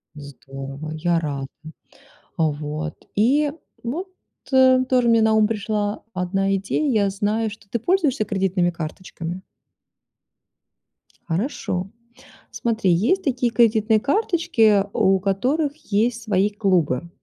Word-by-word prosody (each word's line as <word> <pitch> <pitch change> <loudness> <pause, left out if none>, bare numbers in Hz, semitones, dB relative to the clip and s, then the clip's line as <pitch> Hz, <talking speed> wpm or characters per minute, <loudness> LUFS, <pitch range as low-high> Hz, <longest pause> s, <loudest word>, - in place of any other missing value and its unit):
Здорово, 140 +1 -8
я 170 +1 +1
рада. 140 -4 -4 0.9
А, 160 -2 +2
вот 150 +2 -5 0.2
и, 280 +8 +2 0.3
ну, 300 +11 -3 0.4
т 260 -1 +4
тоже 250 -2 +3
мне 230 -1 +4
на 220 0 +3
ум 215 -1 +4
пришла 210 -1 -2
одна 195 +1 0
идея. 200 +10 -1
Я 200 - +1
знаю, 210 +3 -1
что 200 -1 -13
ты 235 - -1
пользуешься 290 - +1
кредитными 190 -3 0
карточками? 170 +2 -7 1.8
Хорошо. 185 - -2 0.6
Смотри, 225 -5 0
есть 230 - +2
такие 255 -5 0
кредитные 220 -2 +3
карточки, 275 - +2
у 190 0 +3
которых 260 - 0
есть 230 -4 -1
свои 205 -2 +2
клубы. 180 - 0
205 Hz, 115 wpm, -22 LUFS, 175-240 Hz, 1.8 s, т